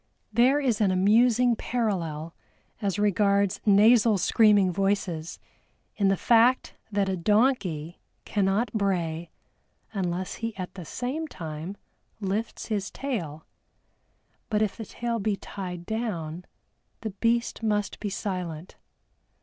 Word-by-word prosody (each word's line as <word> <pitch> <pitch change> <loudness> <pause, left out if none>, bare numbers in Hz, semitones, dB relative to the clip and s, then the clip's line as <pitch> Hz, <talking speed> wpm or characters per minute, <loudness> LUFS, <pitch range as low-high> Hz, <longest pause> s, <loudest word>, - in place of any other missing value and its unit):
There 250 +5 +4
is 245 -7 0
an 205 - +4
amusing 230 +6 +4
parallel 170 -11 -2 0.5
as 200 -2 -1
regards 200 -1 +2
nasal 215 +2 +6
screaming 205 -1 +4
voices 190 -4 -1 0.6
in 200 -2 +2
the 195 0 +3
fact 240 +5 +3 0.2
that 200 -1 +1
a 190 - 0
donkey 185 - +1 0.2
cannot 205 +2 0
bray 175 -6 -1 0.6
unless 185 -2 -2
he 230 -2 -3
at 185 -2 -5
the 180 -3 -8
same 265 - -3
time 165 - -7 0.4
lifts 210 +3 -3
his 210 -2 -2
tail 170 - -4 1.0
but 215 -1 +2
if 210 - -1
the 225 - -7
tail 235 +2 -3
be 210 0 0
tied 180 -3 -7
down, 180 -7 -3 0.6
the 220 - -4
beast 235 +5 0
must 210 -2 -1
be 210 - -3
silent. 180 -4 -5
200 Hz, 120 wpm, -27 LUFS, 180-225 Hz, 1.0 s, nasal